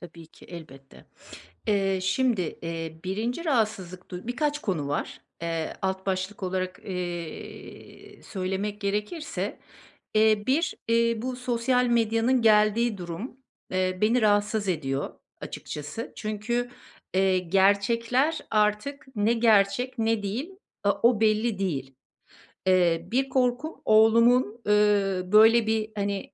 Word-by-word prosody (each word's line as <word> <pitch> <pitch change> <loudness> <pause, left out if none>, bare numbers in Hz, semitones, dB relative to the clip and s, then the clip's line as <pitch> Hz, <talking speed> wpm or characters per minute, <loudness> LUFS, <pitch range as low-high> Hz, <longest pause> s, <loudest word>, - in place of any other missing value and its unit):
Tabii 170 -2 -12
ki - - -19
elbette. 135 -6 -12 0.6
Eee, 195 -2 +1
şimdi, 205 -4 0
eee, 165 -1 -5
1’inci 225 - -3
rahatsızlık 210 - -1
du 180 +2 -7
Birkaç 295 +4 -1
konu 165 - -2
var. 145 - -3 0.2
Eee, 165 -1 -3
alt 190 0 -2
başlık 190 +1 -3
olarak, 185 0 -3
eee, 175 -3 -7
söylemek 195 +2 -4
gerekirse. 210 - -3 0.6
Eee, 215 -1 +4
1, 300 +6 +1
eee, 230 0 +3
bu 255 0 -3
sosyal 250 0 +1
medyanın 230 +1 +2
geldiği 215 +1 +3
durum, 180 +9 -6 0.3
eee, 185 0 -1
beni 230 +3 +3
rahatsız 205 -1 +2
ediyor 140 -5 -2 0.3
açıkçası. 150 +10 -7
Çünkü, 235 +3 -2 0.4
eee, 190 -1 +3
gerçekler 215 - +2
artık 215 +7 0
ne 210 +2 +2
gerçek 230 +2 +2
ne 225 -1 +1
değil, 230 - -3 0.3
a 200 - +4
o 235 -2 +4
belli 215 -1 +2
değil. 135 -9 -3 0.7
Eee, 175 -2 +3
bir 265 +2 +1
korkum 255 +4 -1
oğlumun, 230 +1 +4
eee, 205 -2 +3
böyle, 220 +1 +6
bir, 220 0 0
hani, 200 -1 -3
210 Hz, 120 wpm, -26 LUFS, 185-235 Hz, 0.7 s, böyle